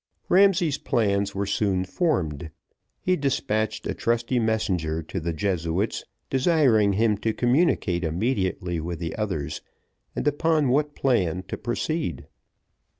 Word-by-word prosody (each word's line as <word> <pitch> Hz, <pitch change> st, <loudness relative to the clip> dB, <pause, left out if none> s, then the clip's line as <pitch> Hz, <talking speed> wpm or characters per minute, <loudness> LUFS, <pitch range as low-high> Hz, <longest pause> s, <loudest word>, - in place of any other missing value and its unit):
Ramsay's 180 Hz, -6 st, +4 dB
plans 100 Hz, -3 st, 0 dB
were 100 Hz, +1 st, -1 dB
soon 100 Hz, -2 st, 0 dB
formed, 85 Hz, -, -1 dB, 0.5 s
he 185 Hz, -, +1 dB
despatched 110 Hz, -, -1 dB
a -, -, -1 dB
trusty 120 Hz, +2 st, 0 dB
messenger 90 Hz, -8 st, 0 dB
to 95 Hz, +5 st, -5 dB
the 85 Hz, +1 st, -2 dB
Jesuit's, 90 Hz, +3 st, -1 dB, 0.2 s
desiring 130 Hz, -, +3 dB
him 105 Hz, 0 st, +2 dB
to 110 Hz, 0 st, 0 dB
communicate 120 Hz, -, +1 dB
immediately 90 Hz, -1 st, -1 dB
with 85 Hz, +2 st, -4 dB
the 85 Hz, 0 st, -4 dB
others, 95 Hz, -10 st, -3 dB, 0.5 s
and -, -, -2 dB
upon 150 Hz, -1 st, +2 dB
what 145 Hz, +3 st, +1 dB
plan 95 Hz, -10 st, +1 dB
to -, -, -2 dB
proceed. 120 Hz, -, -3 dB
105 Hz, 125 wpm, -25 LUFS, 90-135 Hz, 0.5 s, Ramsay's